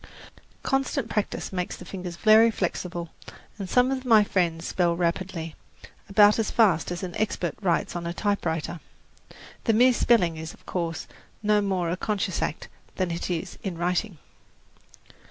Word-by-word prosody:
Constant 270 Hz, -2 st, 0 dB
practice 210 Hz, -2 st, -2 dB
makes 180 Hz, -1 st, -2 dB
the -, -, -11 dB
fingers 180 Hz, -3 st, -6 dB
very 220 Hz, +5 st, +6 dB
flexible, 175 Hz, -4 st, -3 dB, 0.5 s
and 195 Hz, -2 st, -5 dB
some 250 Hz, +1 st, +3 dB
of 260 Hz, -1 st, -2 dB
my 225 Hz, -4 st, +6 dB
friends 170 Hz, -4 st, 0 dB
spell 175 Hz, -2 st, +1 dB
rapidly 170 Hz, -1 st, -2 dB, 0.6 s
about 205 Hz, +2 st, +6 dB
as 225 Hz, -, 0 dB
fast 195 Hz, -8 st, +3 dB
as 175 Hz, +2 st, -4 dB
an 180 Hz, -2 st, -5 dB
expert 195 Hz, -5 st, -1 dB
writes 180 Hz, -3 st, 0 dB
on 170 Hz, -1 st, -3 dB
a -, -, -2 dB
typewriter. 175 Hz, -4 st, -2 dB, 0.9 s
The 225 Hz, -, +3 dB
mere 250 Hz, +3 st, +5 dB
spelling 185 Hz, -10 st, +3 dB
is, 160 Hz, 0 st, -7 dB
of -, -, -27 dB
course, 170 Hz, -3 st, -3 dB, 0.4 s
no 210 Hz, 0 st, +3 dB
more 185 Hz, -4 st, -1 dB
a 180 Hz, -, -2 dB
conscious 200 Hz, -2 st, -1 dB
act 155 Hz, -, -3 dB, 0.3 s
than 185 Hz, -2 st, -1 dB
it 170 Hz, +2 st, -3 dB
is 170 Hz, -3 st, -4 dB
in 185 Hz, -4 st, -4 dB
writing. 180 Hz, +2 st, -1 dB
185 Hz, 155 wpm, -26 LUFS, 170-210 Hz, 0.9 s, very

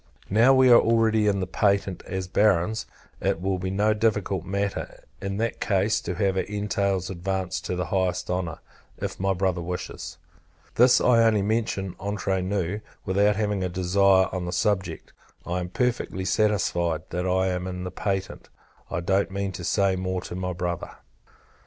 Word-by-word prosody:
Now 115 Hz, +6 st, +6 dB
we 130 Hz, -1 st, +6 dB
are 120 Hz, -, +9 dB
already 110 Hz, -2 st, +3 dB
in 100 Hz, -1 st, +1 dB
the -, -, 0 dB
patent, 100 Hz, 0 st, 0 dB
as 95 Hz, -1 st, -3 dB
Barons; 105 Hz, +2 st, +2 dB, 0.3 s
it -, -, 0 dB
will 95 Hz, +1 st, -1 dB
be 95 Hz, +1 st, -3 dB
no 105 Hz, +3 st, +2 dB
difficult 105 Hz, -4 st, 0 dB
matter, 100 Hz, +1 st, -3 dB, 0.2 s
in 100 Hz, 0 st, -3 dB
that 115 Hz, +2 st, -2 dB
case, 100 Hz, +1 st, +1 dB
to -, -, -4 dB
have 95 Hz, -2 st, +1 dB
our -, -, +3 dB
entails 100 Hz, -2 st, -1 dB
advanced 95 Hz, 0 st, -3 dB
to 90 Hz, -, -2 dB
the 90 Hz, -1 st, -2 dB
highest 95 Hz, -2 st, 0 dB
honour, 90 Hz, -3 st, -2 dB, 0.4 s
if -, -, -5 dB
my 95 Hz, 0 st, +1 dB
brother 90 Hz, -1 st, 0 dB
wishes. 90 Hz, -1 st, -6 dB, 0.6 s
This 125 Hz, +1 st, +6 dB
I 115 Hz, -2 st, +4 dB
only 110 Hz, -3 st, +3 dB
mention 100 Hz, -3 st, -1 dB
entre 100 Hz, -1 st, -1 dB
nous, 95 Hz, +1 st, -2 dB, 0.2 s
without 100 Hz, +2 st, +3 dB
having 105 Hz, -2 st, -1 dB
a 90 Hz, -, -1 dB
desire 95 Hz, +1 st, +3 dB
on 90 Hz, -1 st, -3 dB
the 90 Hz, -, -3 dB
subject. 100 Hz, 0 st, -1 dB, 0.3 s
I 90 Hz, +1 st, -2 dB
am 90 Hz, 0 st, -4 dB
perfectly 120 Hz, -5 st, -1 dB
satisfied, 90 Hz, -5 st, +1 dB
that 90 Hz, +2 st, -2 dB
I 95 Hz, +1 st, +2 dB
am 90 Hz, 0 st, -2 dB
in 90 Hz, -1 st, -5 dB
the 90 Hz, -, -5 dB
patent. 95 Hz, +1 st, -3 dB, 0.4 s
I 85 Hz, -, -2 dB
don't 95 Hz, +3 st, +1 dB
mean 100 Hz, 0 st, -3 dB
to 90 Hz, -1 st, -7 dB
say 100 Hz, +2 st, +2 dB
more 95 Hz, 0 st, -2 dB
to -, -, -8 dB
my 90 Hz, 0 st, -2 dB
Brother. 85 Hz, 0 st, -4 dB
95 Hz, 175 wpm, -25 LUFS, 90-105 Hz, 0.6 s, are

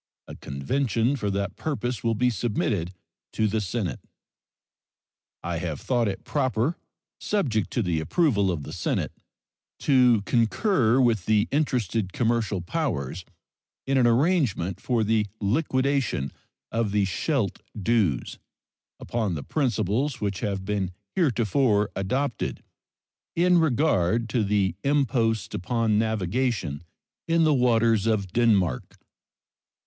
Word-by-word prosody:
A -, -, -8 dB
convention 115 Hz, -, -1 dB
for 105 Hz, -6 st, -2 dB
that 100 Hz, -1 st, -2 dB
purpose 125 Hz, -6 st, -3 dB
will 115 Hz, -1 st, +1 dB
be 125 Hz, +3 st, +2 dB
submitted 105 Hz, -5 st, -1 dB, 0.4 s
to 110 Hz, -, +1 dB
the 110 Hz, +1 st, 0 dB
Senate. 95 Hz, -, -3 dB, 1.4 s
I 85 Hz, -1 st, -2 dB
have 80 Hz, -4 st, -4 dB
thought 120 Hz, -3 st, 0 dB
it 95 Hz, -1 st, -4 dB
proper, 130 Hz, +1 st, 0 dB, 0.4 s
subject 125 Hz, -, 0 dB
to 120 Hz, -, +1 dB
the 85 Hz, -4 st, 0 dB
approval 100 Hz, -, +2 dB
of 85 Hz, -5 st, -2 dB
the 75 Hz, -, -8 dB
Senate, 85 Hz, -, -1 dB, 0.7 s
to 125 Hz, -6 st, +4 dB
concur 120 Hz, -, +2 dB
with 115 Hz, -7 st, +2 dB
the 110 Hz, 0 st, +3 dB
interested 115 Hz, -, 0 dB
commercial 115 Hz, -5 st, 0 dB
powers 90 Hz, -, -3 dB, 0.6 s
in 135 Hz, -, 0 dB
an 120 Hz, -, +4 dB
arrangement 120 Hz, -, +1 dB
for 120 Hz, -3 st, +1 dB
the 110 Hz, -1 st, +1 dB
liquidation 130 Hz, -, 0 dB, 0.4 s
of 115 Hz, -3 st, 0 dB
the 105 Hz, -1 st, +2 dB
Scheldt 105 Hz, -, -1 dB, 0.2 s
dues, 100 Hz, -, 0 dB, 0.6 s
upon 110 Hz, -7 st, -2 dB
the 75 Hz, -, -5 dB
principles 125 Hz, -, 0 dB
which 100 Hz, -3 st, -2 dB
have 100 Hz, -2 st, -3 dB
been 100 Hz, -2 st, -1 dB, 0.3 s
heretofore 120 Hz, -, +2 dB
adopted 115 Hz, +6 st, -2 dB, 0.7 s
in 175 Hz, +1 st, +4 dB
regard 115 Hz, -, +2 dB
to 115 Hz, 0 st, +1 dB
the 100 Hz, -3 st, +1 dB
imposts 115 Hz, -7 st, +1 dB
upon 110 Hz, +2 st, 0 dB
navigation 110 Hz, -, -1 dB, 0.5 s
in 165 Hz, 0 st, +3 dB
the 155 Hz, -1 st, +4 dB
waters 115 Hz, -4 st, +3 dB
of 100 Hz, -5 st, 0 dB
Denmark. 100 Hz, -, +1 dB
110 Hz, 120 wpm, -25 LUFS, 95-130 Hz, 1.4 s, to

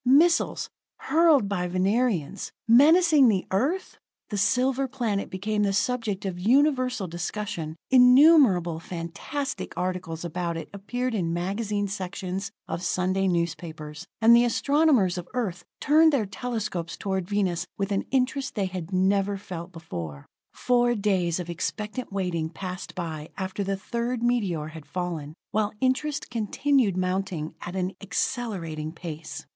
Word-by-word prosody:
Missiles, 310 Hz, +7 st, +4 dB, 0.3 s
hurled 315 Hz, -9 st, +4 dB
by 180 Hz, -3 st, -1 dB
Venerians, 195 Hz, -, 0 dB, 0.2 s
menacing 300 Hz, +4 st, +6 dB
the 195 Hz, -4 st, +1 dB
Earth! 290 Hz, -, -1 dB, 0.3 s
The 205 Hz, -, -2 dB
silver 260 Hz, +6 st, +2 dB
planet 235 Hz, -6 st, -2 dB
became 210 Hz, +3 st, -2 dB
the 200 Hz, -1 st, +2 dB
subject 210 Hz, -3 st, -1 dB
of 180 Hz, -2 st, -3 dB
universal 255 Hz, 0 st, +2 dB
discussion; 175 Hz, -2 st, -4 dB, 0.2 s
innumerable 250 Hz, -, +6 dB
fantastic 175 Hz, -, -5 dB
articles 180 Hz, -2 st, -3 dB
about 170 Hz, 0 st, -3 dB
it 165 Hz, -, -7 dB
appeared 245 Hz, +5 st, -3 dB
in 170 Hz, -6 st, -1 dB
magazine 205 Hz, +3 st, -1 dB
sections 190 Hz, 0 st, -4 dB, 0.2 s
of 170 Hz, -, -3 dB
Sunday 185 Hz, +2 st, 0 dB
newspapers. 165 Hz, -2 st, -3 dB
And 230 Hz, +1 st, +7 dB
the 235 Hz, -, +6 dB
astronomers 245 Hz, -, +3 dB
of 175 Hz, -, -8 dB
Earth 205 Hz, -8 st, -2 dB
turned 315 Hz, +2 st, +5 dB
their 265 Hz, -7 st, +1 dB
telescopes 200 Hz, -4 st, -4 dB
toward 190 Hz, -3 st, -2 dB
Venus 190 Hz, -3 st, 0 dB
with 200 Hz, 0 st, -2 dB
an 195 Hz, -, 0 dB
interest 265 Hz, +1 st, 0 dB
they 200 Hz, -3 st, 0 dB
had 185 Hz, -2 st, -5 dB
never 195 Hz, +2 st, +2 dB
felt 180 Hz, -3 st, -7 dB
before. 85 Hz, -, -7 dB, 0.3 s
Four 245 Hz, -1 st, +2 dB
days 190 Hz, -5 st, +1 dB
of 175 Hz, -, -5 dB
expectant 210 Hz, +8 st, -4 dB
waiting 180 Hz, -5 st, -1 dB
passed 180 Hz, +2 st, -7 dB
by 160 Hz, -3 st, -5 dB
after 190 Hz, +1 st, -3 dB
the 195 Hz, 0 st, -1 dB
third 235 Hz, +4 st, -3 dB
meteor 195 Hz, -11 st, 0 dB
had 155 Hz, -2 st, -11 dB
fallen, 165 Hz, -5 st, -4 dB, 0.2 s
while 210 Hz, 0 st, +1 dB
interest 265 Hz, +3 st, 0 dB
continued 235 Hz, -1 st, +1 dB
mounting 185 Hz, -4 st, -2 dB
at 175 Hz, -, -6 dB
an 185 Hz, 0 st, -1 dB
accelerating 180 Hz, -7 st, -3 dB
pace. 160 Hz, -3 st, -7 dB
195 Hz, 135 wpm, -26 LUFS, 175-245 Hz, 0.3 s, And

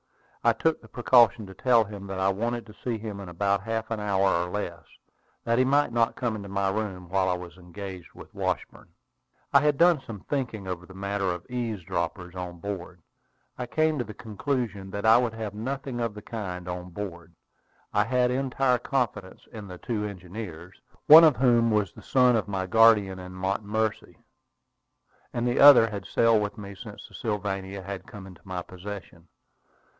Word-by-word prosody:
I -, -, +5 dB
took 160 Hz, 0 st, 0 dB
the 110 Hz, -, -15 dB
precaution 120 Hz, -1 st, +4 dB
to 95 Hz, -, -11 dB
tell 120 Hz, +1 st, +4 dB
him 100 Hz, -1 st, -9 dB
that 95 Hz, -1 st, -4 dB
I 95 Hz, +1 st, +2 dB
wanted 115 Hz, +4 st, -2 dB
to 105 Hz, -, -13 dB
see 115 Hz, +2 st, -3 dB
him 105 Hz, -2 st, -6 dB
in 95 Hz, -3 st, -8 dB
about 100 Hz, +3 st, 0 dB
half 115 Hz, +1 st, -3 dB
an 110 Hz, -, -1 dB
hour 100 Hz, -2 st, +1 dB, 0.2 s
or 90 Hz, -, -5 dB
less, 85 Hz, -5 st, -5 dB, 0.6 s
that 115 Hz, +1 st, +1 dB
he -, -, +5 dB
might 140 Hz, 0 st, +2 dB
not 115 Hz, -1 st, +2 dB
come 120 Hz, -3 st, -2 dB
into 100 Hz, -2 st, -7 dB
my 100 Hz, 0 st, 0 dB
room 95 Hz, -4 st, -4 dB
while 95 Hz, 0 st, +1 dB
I 90 Hz, -, +1 dB
was 90 Hz, 0 st, -9 dB
engaged 90 Hz, 0 st, -9 dB
with -, -, -13 dB
Washburn. -, -, -3 dB, 0.6 s
I 140 Hz, -, +8 dB
had 150 Hz, -1 st, +2 dB
done 170 Hz, -3 st, +5 dB
some 115 Hz, -6 st, -9 dB
thinking 115 Hz, -8 st, -3 dB
over 90 Hz, -1 st, -5 dB
the 95 Hz, -, -13 dB
matter 100 Hz, +1 st, -2 dB
of 90 Hz, -1 st, -2 dB
eavesdroppers 90 Hz, -7 st, -3 dB
on 90 Hz, -1 st, -6 dB
board. 90 Hz, -2 st, -7 dB, 0.6 s
I 125 Hz, -, -3 dB
came 155 Hz, +2 st, +1 dB
to -, -, 0 dB
the 110 Hz, -1 st, -10 dB
conclusion 110 Hz, -3 st, -3 dB
that 100 Hz, +2 st, -4 dB
I 110 Hz, +2 st, +7 dB
would 120 Hz, -3 st, -1 dB
have 110 Hz, -2 st, -5 dB
nothing 130 Hz, +3 st, -4 dB
of 115 Hz, -3 st, -2 dB
the 105 Hz, -, -9 dB
kind 90 Hz, -6 st, -6 dB
on 90 Hz, 0 st, -5 dB
board. 85 Hz, -3 st, -7 dB, 0.6 s
I 105 Hz, -, +4 dB
had 125 Hz, +1 st, +2 dB
entire 130 Hz, -1 st, +1 dB
confidence 110 Hz, -8 st, -2 dB
in 105 Hz, -3 st, -8 dB
the 90 Hz, -1 st, -9 dB
two 110 Hz, +1 st, -3 dB
engineers, 90 Hz, -2 st, -8 dB, 0.2 s
one 160 Hz, +2 st, +11 dB
of 155 Hz, -4 st, +6 dB
whom 120 Hz, -2 st, +4 dB
was 105 Hz, -4 st, +1 dB
the -, -, -13 dB
son 125 Hz, -2 st, +4 dB
of 110 Hz, -, 0 dB
my 95 Hz, -2 st, -2 dB
guardian 105 Hz, -2 st, +4 dB
in 90 Hz, 0 st, -9 dB
Montomercy, 105 Hz, +3 st, -2 dB, 1.1 s
and 120 Hz, -1 st, -1 dB
the 120 Hz, -, +1 dB
other 135 Hz, -6 st, +9 dB
had 100 Hz, -2 st, -6 dB
sailed 115 Hz, -2 st, +3 dB
with 105 Hz, +2 st, -3 dB
me 100 Hz, -1 st, -8 dB
since 95 Hz, -, -10 dB
the -, -, -21 dB
Sylvania 100 Hz, -2 st, -3 dB
had 95 Hz, +1 st, -7 dB
come 105 Hz, -6 st, -10 dB
into 90 Hz, -3 st, -13 dB
my 90 Hz, -2 st, -5 dB
possession. 95 Hz, -2 st, -9 dB
105 Hz, 190 wpm, -27 LUFS, 95-120 Hz, 1.1 s, one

